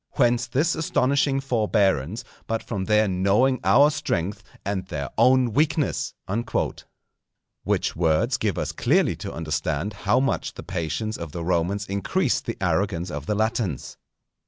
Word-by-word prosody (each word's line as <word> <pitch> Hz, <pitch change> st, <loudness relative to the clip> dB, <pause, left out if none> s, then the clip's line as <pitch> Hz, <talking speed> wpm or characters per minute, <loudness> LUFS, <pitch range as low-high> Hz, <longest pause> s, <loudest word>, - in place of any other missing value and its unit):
Whence 120 Hz, -2 st, +2 dB
this 150 Hz, +8 st, +1 dB
astonishing 140 Hz, -2 st, +1 dB
forbearance, 105 Hz, -, +1 dB, 0.2 s
but 115 Hz, 0 st, -2 dB
from 100 Hz, -5 st, -3 dB
their 105 Hz, +1 st, +3 dB
knowing 100 Hz, +8 st, +2 dB
our 145 Hz, +2 st, +6 dB
strength 125 Hz, -, -2 dB, 0.2 s
and 95 Hz, -2 st, -2 dB
their 70 Hz, -6 st, -4 dB
own 125 Hz, -3 st, +4 dB
weakness_?" 150 Hz, +1 st, +1 dB, 1.5 s
Which -, -, 0 dB
words 85 Hz, +9 st, +2 dB
give 105 Hz, -6 st, -1 dB
us -, -, -2 dB
clearly -, -, +2 dB
to -, -, -6 dB
understand 80 Hz, +3 st, -2 dB, 0.2 s
how 105 Hz, -, +5 dB
much 135 Hz, +1 st, -1 dB
the -, -, -8 dB
patience 95 Hz, +5 st, -3 dB
of 85 Hz, -3 st, -7 dB
the 85 Hz, -, -4 dB
Romans 90 Hz, +4 st, 0 dB
increased 120 Hz, -, -1 dB
the 115 Hz, -, -3 dB
arrogance 90 Hz, -1 st, 0 dB
of 75 Hz, -2 st, -6 dB
the 105 Hz, -, 0 dB
Latins. 110 Hz, -, -2 dB
105 Hz, 140 wpm, -24 LUFS, 90-125 Hz, 1.5 s, our